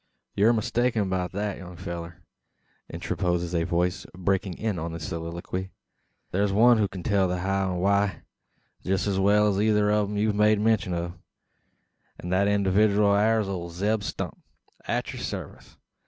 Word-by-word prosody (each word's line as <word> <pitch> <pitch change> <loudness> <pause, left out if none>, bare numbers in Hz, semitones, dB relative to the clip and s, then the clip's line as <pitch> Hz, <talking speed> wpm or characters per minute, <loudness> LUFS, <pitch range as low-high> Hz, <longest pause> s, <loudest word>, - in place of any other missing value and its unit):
"Yur 105 +4 +4
mistaken 115 -2 0
beout 90 -1 -1
thet, 100 0 -3
young 90 -2 -10
fellur," 85 0 -7 0.7
interposes 85 -1 -2
a 85 -1 +1
voice 90 +2 0
breaking 95 0 0
in 105 -5 -2
on 80 +1 -4
the 85 - -5
soliloquy. 85 +4 -5 0.6
"Thur's 100 +2 +1
one 115 +3 +5
who 105 - +2
kin 95 -2 -8
tell 95 0 +2
the 90 0 -1
how 95 +1 0
and 90 - -2
the 90 - -2
why, 100 -3 +1 0.6
jest 95 0 0
as 100 -2 0
well 105 +2 +4
as 100 -1 0
eyther 105 -1 +3
o' 105 -1 +2
them 105 0 -4
ye've 105 +1 +1
made 105 0 +3
mention 105 -4 +1
o'; 85 0 -3 1.0
and 90 - -6
thet 95 +2 +3
individooal 100 +1 +3
air 110 +2 +3
ole 95 -4 -4
Zeb 105 +5 0
Stump, 100 - -5 0.5
at - - -2
your - - -7
sarvice. - - -7
95 Hz, 170 wpm, -26 LUFS, 90-105 Hz, 1.0 s, one